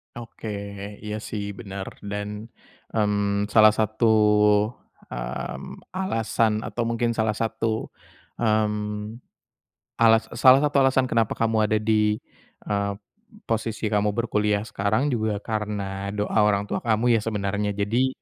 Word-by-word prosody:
Oke. 115 -1 -9 0.6
Iya 105 0 -4
sih 100 -1 -5
bener. 100 -2 -7
Dan, 105 +1 -5 0.5
mmm, 105 -1 +1
salah 110 -1 +7
satu, 110 +1 +1 1.0
mmm, - - -6
alasan 115 - 0
atau 120 - -3
mungkin 115 0 0
salah 110 -2 0
satu, 110 0 -2 0.5
mmm, 105 0 -1 0.8
alas 115 -1 +5
salah 130 +2 +7
satu 150 -1 +1
alasan 135 -1 +4
kenapa 115 -2 +1
kamu 110 -1 +2
ada 110 - +2
di, 105 -1 +2 0.5
eee, 100 -1 -1 0.5
posisi 110 -1 -2
kamu 105 0 +2
berkuliah 105 -3 0
sekarang 110 +6 0
juga 110 -3 0
karena 100 -3 -3
doa 105 +1 0
orang 105 -1 +3
tua - - -3
kamu 115 +1 +2
ya 115 - +3
sebenarnya. 105 -1 -2
Jadi, 115 +6 +1
110 Hz, 120 wpm, -24 LUFS, 105-115 Hz, 1.0 s, salah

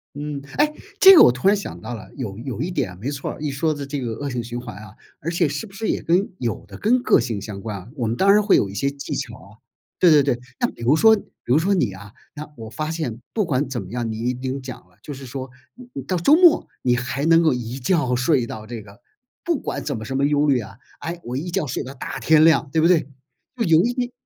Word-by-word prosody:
嗯， 145 -1 -5
哎， 300 +1 +3 0.3
这 385 -1 +10
个 - - +9
我 - - +7
突 125 +9 -1
然 205 +1 +5
想 200 - -7
到 120 - -5
了， 105 - -11
有 110 -7 -5
有 125 0 -5
一 165 - -2
点 110 - -2
没 125 +8 -3
错 140 -2 -4
儿， - - -10
一 150 - -1
说 155 +3 0
的 145 - -6
这 145 0 -3
个 120 -3 -3
恶 140 +5 -4
性 120 -2 -3
循 120 +1 -6
环 120 - -9
啊， 105 0 -12 0.3
而 170 0 -3
且 170 -2 +1
是 145 +10 -4
不 195 - -15
是 220 +2 -4
也 - - -1
跟 180 +4 +2
有 120 -3 -3
的 - - -10
跟 245 +4 +2
个 - - +4
性 115 -4 -3
相 100 -1 -7
关 105 0 -5
啊。 95 - -13
我 125 - -2
们 115 +1 -1
当 195 +6 +4
然 210 +1 +5
会 200 - +4
有 100 - +2
一 95 - -9
些 140 +7 0
技 140 0 -6
巧 - - -4
啊， - - -16 0.5
对 175 - +5
对 150 -2 +7
对， 135 -3 0 0.2
那 - - +2
比 115 - -11
如 130 +6 +4
说 220 +5 +6
比 200 - -7 0.2
如 125 +5 +3
说 190 +5 +2
你 170 - +1
啊， 100 +2 -11 0.2
那 150 +1 -7
我 110 -1 -8
发 155 +7 -4
现 130 -8 -4
不 215 - +1
管 140 -4 0
怎 125 -5 -4
么 90 - -10
样 120 0 -3
你 120 +3 -2
有 130 +1 -2
讲 130 -2 -8
了， 90 - -29
就 145 - -7
是 135 - -10
说 130 +1 -6 0.2
你 250 -1 -14
你 135 - -6
到 180 +8 -2
周 280 - +5
末 350 -2 +5 0.2
你 125 -1 +3
还 130 +3 -2
能 165 +1 +5
够 160 -3 +3
一 125 +2 -5
觉 130 -3 +1
睡 130 0 +2
到 110 -1 -8
这 115 -2 -7
个 100 +2 -16 0.4
不 335 -5 0
管 140 - -4
怎 140 -2 -3
么 110 - -7
什 135 - -4
么 140 +1 +2
忧 145 0 +2
虑 135 -3 +3
啊， 110 -2 -9 0.2
哎， 170 +1 -5
我 125 +1 -5
一 170 +5 -4
觉 170 - -1
睡 125 - -3
到 130 - -7
大 - - -6
天 155 -1 +5
亮 160 -3 +4
对 160 - +1
不 165 - +6
对？ 165 -6 +3 0.5
就 240 - -1
有 165 0 +5
一 240 - +1
点 245 -1 -2
140 Hz, 300 characters per minute, -22 LUFS, 120-165 Hz, 0.5 s, 这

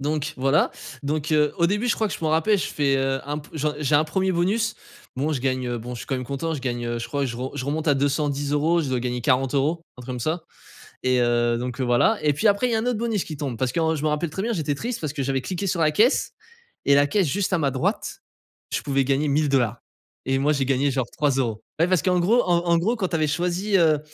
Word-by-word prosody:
Donc 150 +2 -2
voilà. 135 +4 +2 0.3
Donc, 150 +1 -2
heu, 150 -1 +3
au 170 -1 +3
début 210 +6 0
je - - +3
crois 220 - 0
que - - -4
je - - -7
m'en 155 -1 0
rappelle, 165 +7 +3
je - - -1
fais, 140 -2 +1
heu, 135 0 0
un 145 +1 -2
peu 150 - -13 0.3
j'ai 150 -1 0
un 145 - +6
premier 190 +4 0
bonus, 205 +6 +1 0.4
bon 150 +4 0
je 135 - -2
gagne. 130 -1 -1
Heu, 120 - -2
bon 120 +2 -6
je 120 - -7
suis - - -8
quand 135 - -1
même 125 - -4
content, 140 +6 -3
je 145 - -5
gagne, 120 -2 -2
je 115 - -4
crois 140 -1 -1
je 120 -3 -4
re 130 +2 -4
je 130 - -3
remonte 155 +3 -2
à 145 - +5
210€, 145 +3 +1
je 140 - -3
dois 130 -1 0
gagner 125 0 -2
40€, 135 +5 +1
un 125 - -10
truc - - -12
comme 125 - -4
ça. 160 +7 -1 0.6
Et, 130 -1 +3
heu, 120 0 +2
donc, 125 +2 -4
heu, - - +1
voilà. 120 - +3
Et 150 - +4
puis 210 +10 +2
après 205 +5 +2
il - - -1
y - - +2
a - - +2
un 240 - -3
autre 245 -4 0
bonus 225 -4 -1
qui 155 - -7
tombe. 140 -5 -4
Parce 130 +2 0
que - - -2
en 160 0 +2
je 150 - -4
me 155 - +2
rappelle 150 +2 -1
très 190 - -4
bien, 235 +2 -1
j'étais 155 -7 -1
triste 235 - -4
parce 155 -3 -3
que 145 -2 -3
j'avais 135 0 0
cliqué 190 +5 -3
sur 170 -1 -1
la 155 -1 +3
caisse 225 - +2 0.5
et 140 - +5
la 145 0 +5
caisse 185 +2 +1
juste 190 +6 -1
à 180 - +3
ma 140 -3 +1
droite, 130 0 -2 0.5
je - - -1
pouvais 135 -1 +1
gagner 140 +3 +1
1000$. 135 -6 +1 0.5
Et 135 0 +1
moi 145 +3 +2
j'ai 140 -2 0
gagné 135 +1 +2
genre, 130 -2 -1
3€. 130 -7 0 0.2
Ouais 165 - +4
parce 185 -3 +2
qu'en 180 -2 +2
gros, 230 +8 +4
en 175 -1 +3
en 170 0 +4
gros 220 +8 +1
quand 195 -5 -1
tu - - -5
avais 155 -1 +1
choisi, 180 +6 0
heu, 155 -4 +4
145 Hz, 275 wpm, -24 LUFS, 135-170 Hz, 0.6 s, un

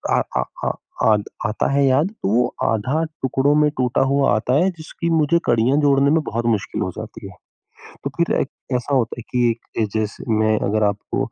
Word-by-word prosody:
अ - - +3 0.2
अ - - +2 0.2
अ - - +2 0.4
अ, 110 - +6 0.3
आता 105 - -1
है 140 0 +3
याद 135 +5 +3 0.2
तो - - +1
वो 120 +4 +3 0.2
आधा 130 +9 0 0.2
टुकड़ों 135 +2 +2
में 150 - +4
टूटा 125 -1 +1
हुआ 140 0 +3
आता 120 +3 0
है 180 +6 +3
जिसकी 170 0 -5
मुझे 165 0 +3
कड़ियाँ 120 +4 +3
जोड़ने 140 0 +4
में 160 - +3
बहुत 115 -3 -3
मुश्किल 110 -4 -1
हो - - -1
जाती - - -8
है। - - -11 0.7
तो 140 - -2
फिर 170 0 +1
एक 135 - -1 0.3
ऐसा 125 +3 -1
होता 120 -2 0
है - - -6
कि 120 -1 +2
एक 115 - -6 0.2
जे 110 - +3
जैसे 105 -1 -4
मैं 110 0 +2
अगर 110 +1 +1
आपको 100 0 -2
130 Hz, 205 wpm, -21 LUFS, 110-145 Hz, 0.7 s, अ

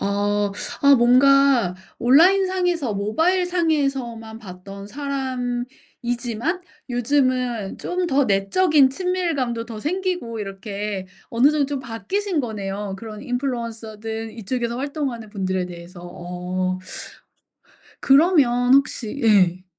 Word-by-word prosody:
아. 205 0 0 0.3
아 280 0 +8
뭔가 255 -4 +5 0.2
온라인상에서 355 - +3
모바일상에서만 275 - 0
봤던 195 -1 -10
사람이지만 250 - -3 0.3
요즘은 250 -4 0
좀 360 - -3
더 280 -3 +2
내적인 265 - +3
친밀감도 300 -9 -1
더 225 -2 -7
생기고 355 - -2
이렇게 200 -1 -5 0.2
어느 245 +5 +4
정도 300 -2 +1
좀 280 -1 -3
바뀌신 355 - -2
거네요 205 -4 -4
그런 215 0 -8
인플루언서들 225 -3 -4
이쪽에서 235 +2 -2
활동하는 270 -5 -3
분들에 185 -3 -2
대해서. 175 0 -11
어. 180 +1 -4 1.2
그러면 270 -5 +4
혹시 275 -2 0
예. 185 -5 +4
240 Hz, 250 characters per minute, -22 LUFS, 205-280 Hz, 1.2 s, 아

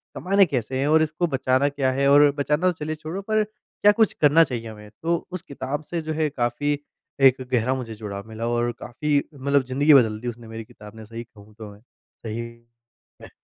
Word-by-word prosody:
कमाने 195 +1 +3
कैसे 130 -3 -2
हैं 140 - +1
और 160 +1 +5
इसको 160 +3 0
बचाना 135 -1 +1
क्या 140 -2 0
है 140 +1 +1
और 145 +1 +7
बचाना 150 +5 +1
तो - - -7
चलिए 155 +1 -3
छोड़ो 160 +5 -6
पर 215 +2 +1
क्या 210 -1 0
कुछ 220 0 +2
करना 150 +2 +6
चाहिए 120 -6 -4
हमें। 105 -1 -11
तो 170 +1 +2 0.2
उस 185 - -4
किताब 140 -2 -5
से 165 +2 -4
जो 155 0 -4
है 155 -1 +2
काफ़ी 140 +3 -1 0.4
एक 130 -1 +6
गहरा 125 +2 +2
मुझे 115 -4 -6
जुड़ाव 100 -1 -7
मिला 110 +1 -5
और 120 0 0
काफ़ी 145 +4 -1 0.2
मतलब 140 0 +1
ज़िंदगी 140 +4 +3
बदल 110 -6 +4
दी 120 - -7
उसने 120 -1 -6
मेरी 115 0 -7
किताब 105 +1 -14
ने 110 - -10
सही 115 +2 -8
कहूँ 105 -2 -18
तो 105 -2 -8
मैं। 100 - -17
सही 115 -2 -9 0.8
में। - - -11
135 Hz, 210 wpm, -24 LUFS, 115-155 Hz, 0.8 s, और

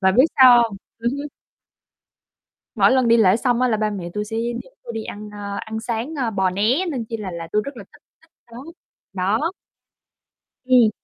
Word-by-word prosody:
Bà 190 -1 +3
biết 255 +7 +6
sao 250 -3 +8
hông? 220 -4 -3 0.2
Ừm 235 +1 0
hứm. 285 +1 -5 1.5
Mỗi - - +4
lần 255 -2 +3
đi 230 0 +5
lễ 195 -3 +5
xong 245 0 0
á, 255 - +3
là 220 -3 +1
ba 215 0 0
mẹ 185 -4 -5
tui 210 0 -3
sẽ 225 +2 -5 0.3
dẫn - - -20
tui - - -7
đi 220 -1 -4
ăn, 210 +1 -8
à, 200 -1 -6
ăn 220 0 -5
sáng, 235 +7 -4
ơ, 250 -5 -1
bò 190 -2 +1
né, 225 - +1
nên 245 -6 -3
chi 225 - -3
là 195 -4 -6
là 170 -1 -6
tui 210 - +2
rất 280 -3 -7
là 205 - -8
thích - - -20 0.2
thích - - -27 0.2
đó, 235 - -10 0.6
đó. 205 - 0 1.1
Ừm. 250 -4 +5
225 Hz, 210 wpm, -21 LUFS, 205-250 Hz, 1.5 s, sao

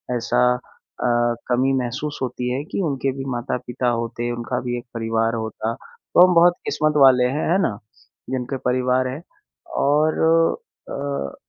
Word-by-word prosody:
ऐसा 120 +1 0 0.2
अ, 120 -1 -2 0.2
कमी 130 +2 +2
महसूस 135 +5 -4
होती 125 -1 -2
है 140 +3 -2
कि - - -2
उनके 135 -1 -1
भी 135 - -5
माता-पिता 125 0 -3
होते, 115 0 -2
उनका 120 +1 -3
भी 120 0 -3
एक 120 - -8
परिवार 115 0 0
होता। 110 0 -3
तो 180 - +2
हम 180 - +2
बहुत 175 +1 +6
किस्मत 155 0 +1
वाले 130 -2 +6
हैं, 135 +5 -1
है 185 - +4
ना? 105 - 0 0.5
जिनके 130 +1 -3
परिवार 125 0 +1
हैं 135 +5 -5 0.6
और 150 +3 +2 0.7
अ, 140 - -4
125 Hz, 150 wpm, -22 LUFS, 120-135 Hz, 0.7 s, बहुत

